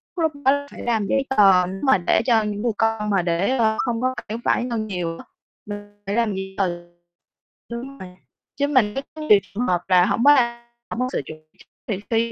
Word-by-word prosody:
lúc 325 -3 +1
đó 285 +1 +2
phải - - -10
làm 220 -4 0
giấy 275 0 +1
tờ. 195 -7 +5
Nếu 190 +2 -6
mà 265 -5 +5
để 175 +3 +2
cho 230 -4 +3
những 210 -1 -3
người 235 0 +1
con 225 -2 0
mà 195 -2 +2
để, 175 +9 0
ơ, 220 -2 +2
hông 240 -2 -2
có 255 0 +1 0.2
phải 220 - -3
phải - - +2
lo 240 - -3
nhiều 180 -6 -3
á. - - -12 0.4
Ừ, 205 - -5 0.3
để 200 - -3
làm 230 -3 +1
giấy 190 0 -6
tờ. 190 -3 +1 1.0
Chứ 235 0 -5 0.2
mình 180 -1 -10 0.4
chứ 285 +1 0
mình 245 -8 +2
thấy 270 - -4
có 310 - -8
nhiều 210 -10 +5
trường 225 +6 -4
hợp 175 -1 +1
là 180 -1 +5
hổng 235 - 0
có, 290 - +8
a, 235 -2 0 0.2
hông - - -5
có 255 - +1
sự - - -1
chuẩn 155 +2 -9 0.5
bị, 200 -4 -2
thì 230 0 +1
220 Hz, 230 wpm, -22 LUFS, 195-245 Hz, 1.0 s, có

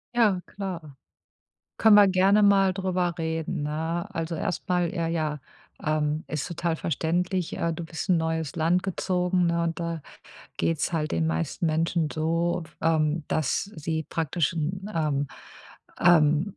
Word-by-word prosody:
Ja, 210 -6 +3
klar. 175 -8 -6 0.8
Können 220 -2 +6
wir 205 -1 +8
gerne 195 +3 +4
mal 195 -2 +5
drüber 185 -2 0
reden, 160 -1 -2
ne? 160 +4 -2
Also, 165 -1 -3
erst 165 +2 -3
mal, 180 -2 +1
äh, 170 -3 -1
ja, 155 -3 -1 0.5
ähm, 155 0 0
ist 150 +2 -3
total 170 -1 -1
verständlich. 175 +3 -1
Äh, 170 - 0
du 165 +1 -5
bist 165 0 -6
in 180 - +4
'n - - +2
neues 160 -2 -2
Land 170 +3 +2
gezogen, 180 -1 0
ne? 170 0 +1
Und 170 0 -2
da 170 -2 -3 0.5
geht 165 -2 0
es - - 0
halt 155 -2 -1
den 80 -1 +1
meisten 80 - -1
Menschen 165 0 +1
so 165 +2 0
f 160 -1 -19
ähm, 160 0 +1
dass 155 -4 0
sie 160 0 -2
praktisch 165 0 -1
'n, 180 +5 -3
ähm, 145 -3 0 0.7
ähm, 160 +2 +4
165 Hz, 160 wpm, -26 LUFS, 155-180 Hz, 0.8 s, wir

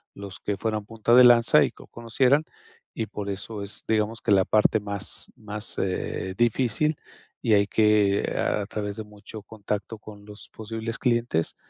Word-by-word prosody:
los 100 -1 -9
que 100 - -3
fueran 110 0 -2
punta 115 +1 0
de 125 0 +9
lanza 120 -1 +6
y - - -4
que - - -15
conocieran, 125 +6 +1 0.5
y 110 - -3
por 100 -1 -6
eso 100 +1 -5
es, 100 - -7
digamos, 110 0 0
que - - -1
la 95 -2 +5
parte 110 +1 +3
más 100 -1 -4
más, 105 +1 -5
eh, 95 0 -3
difícil, 125 +6 +1 0.5
y 115 -3 +2
hay 100 0 +4
que, 105 -2 +2
a 105 - 0
través 105 -2 -4
de 110 - -5
mucho 105 +1 -11
contacto 105 0 -5
con 105 -1 -13
los 105 0 -13
posibles 115 +2 -5
clientes, 120 - 0
105 Hz, 170 wpm, -25 LUFS, 100-115 Hz, 0.5 s, de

